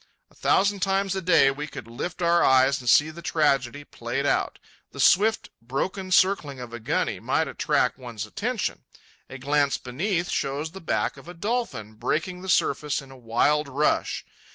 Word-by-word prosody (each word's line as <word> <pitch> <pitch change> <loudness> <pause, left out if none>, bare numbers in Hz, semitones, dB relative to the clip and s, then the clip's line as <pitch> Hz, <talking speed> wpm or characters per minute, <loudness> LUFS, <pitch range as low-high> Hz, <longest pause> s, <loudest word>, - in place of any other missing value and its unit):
A - - -24
thousand 200 +1 +2
times 195 0 0
a 190 - -2
day 165 -6 +5
we 145 +2 -5
could - - -9
lift 165 +10 -5
our 170 0 +4
eyes 130 +1 +4
and 125 - -2
see 150 +8 +5
the 170 +2 -10
tragedy 145 -4 +1
played - - -4
out. - - 0 0.4
The - - -10
swift, 220 +4 +3
broken 185 - -3
circling 185 -8 +2
of 120 -2 -8
a 120 - -6
guny 110 - -1
might - - 0
attract - - 0
one's 120 -4 -6
attention. - - -3 0.5
A 135 - -8
glance 140 +1 +1
beneath 170 - -2
shows 145 +4 -2
the 190 +2 -10
back 165 - -1
of - - -14
a 175 - -9
dolphin 205 - -3
breaking 175 - -2
the 190 - -7
surface 150 -4 +1
in 135 -2 -12
a - - -12
wild 130 +5 +1
rush. 140 +3 0
150 Hz, 175 wpm, -25 LUFS, 130-185 Hz, 0.5 s, day